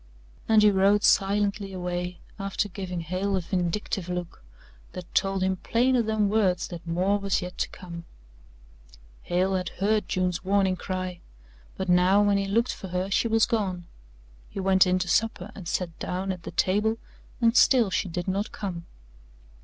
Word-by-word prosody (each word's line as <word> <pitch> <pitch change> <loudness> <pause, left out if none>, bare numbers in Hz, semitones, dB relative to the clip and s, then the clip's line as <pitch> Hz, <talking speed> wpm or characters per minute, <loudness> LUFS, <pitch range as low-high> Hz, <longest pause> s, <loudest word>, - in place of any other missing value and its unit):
And 220 -1 +6
he 210 - +6
rode 200 +2 +3
silently 200 0 +2
away, 180 0 -4 0.2
after 195 +1 -1
giving 180 -3 -5
Hale 185 +4 -2
a - - -1
vindictive 180 +1 -2
look 180 - -5 0.5
that 180 -1 -9
told 195 -1 +1
him 190 0 0
plainer 245 +5 +2
than 220 -2 +1
words 195 -4 +1
that 175 -1 -9
more 185 +5 +1
was 195 -2 0
yet 180 0 -7
to - - 0
come. 170 -2 -9 1.2
Hale 185 +2 0
had 185 -2 -1
heard 210 +3 0
June's 180 -1 -1
warning 190 -1 +2
cry, 185 -1 -5 0.6
but 190 - -3
now 180 +2 +4
when 200 -1 +3
he 195 - -2
looked 230 +5 +1
for 190 - -8
her 185 +2 -3
she 230 - +2
was 225 0 +3
gone. 190 -6 -2 0.6
He - - -7
went 190 -1 +4
in 180 0 +2
to 185 -1 -2
supper 210 -1 0
and 185 -5 -9
sat 175 -2 -3
down 190 +2 -2
at 180 -2 -6
the - - -8
table 210 +4 +1 0.4
and 230 -1 +3
still 240 -6 +5
she 185 - -1
did 175 +2 -4
not 200 +3 -1
come. 175 -5 -6
190 Hz, 170 wpm, -26 LUFS, 180-205 Hz, 1.2 s, And